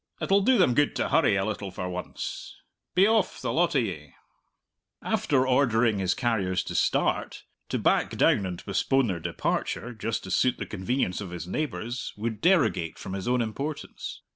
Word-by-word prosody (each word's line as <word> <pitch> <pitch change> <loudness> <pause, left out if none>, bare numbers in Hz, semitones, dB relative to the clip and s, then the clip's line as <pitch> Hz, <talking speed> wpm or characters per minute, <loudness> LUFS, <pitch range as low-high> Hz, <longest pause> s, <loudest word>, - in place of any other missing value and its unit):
"It'll 200 +1 +3
do 255 +5 +4
them 180 - +4
good 145 +3 +2
to - - -1
hurry 150 -11 +4
a 95 0 +1
little 105 -2 -3
for 90 0 -5
once. 90 0 -6 0.4
Be 185 +2 +6
off, 220 -2 +2
the - - -2
lot 170 -1 +2
of 130 - +4
ye!" 75 -9 -6 0.9
After 130 -3 +1
ordering 120 -5 +3
his 95 -2 +1
carriers 100 -7 0
to - - -6
start, - - 0 0.3
to - - 0
back - - +1
down 100 - +3
and 90 -2 -7
postpone 135 +6 +2
their 95 -6 -2
departure, 120 +8 -2
just 110 0 -3
to - - -7
suit 125 - +2
the - - -4
convenience 105 0 -2
of 95 - -6
his 85 -2 -6
neighbours, 125 -1 -3
would 110 0 -3
derogate 155 - +2
from 95 - -7
his 95 +1 -4
own 125 -1 +2
importance. 140 +7 -6
115 Hz, 180 wpm, -27 LUFS, 95-140 Hz, 0.9 s, Be